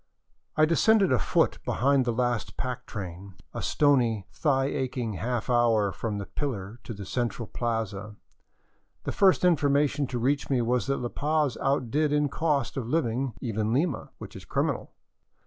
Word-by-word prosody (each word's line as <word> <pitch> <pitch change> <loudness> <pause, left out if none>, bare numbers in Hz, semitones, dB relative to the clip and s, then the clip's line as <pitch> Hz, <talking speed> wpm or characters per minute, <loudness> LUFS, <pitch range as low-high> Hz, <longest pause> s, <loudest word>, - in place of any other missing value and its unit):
I 155 - +6
descended 195 +3 +4
afoot 125 - +2
behind 135 0 +2
the 120 - +1
last 120 -1 -1
pack 125 -1 -4
train, 95 -1 -7 0.2
a - - -4
stony, 120 -9 +2
thigh 135 -4 +1
aching 130 -5 -2
half 115 +5 -2
hour 115 -5 +3
from 105 +1 -3
the 100 - -4
pillar 115 -6 -4
to 115 - -6
the 100 -1 -7
central 120 +1 -2
plaza. 110 -3 -3 0.9
The - - -2
first 190 -2 +4
information 145 -4 +2
to 125 - -3
reach 135 +4 0
me 135 -3 +2
was 125 +2 0
that 135 - +1
La 120 - -2
Paz 150 -1 0
outdid 140 +2 +1
in 150 -1 +2
cost 145 -5 0
of 125 -4 -3
living 130 -4 0
even 110 -2 -1
Lima, 150 +3 0
which - - -10
is - - -9
criminal. - - -1
125 Hz, 160 wpm, -27 LUFS, 115-145 Hz, 0.9 s, I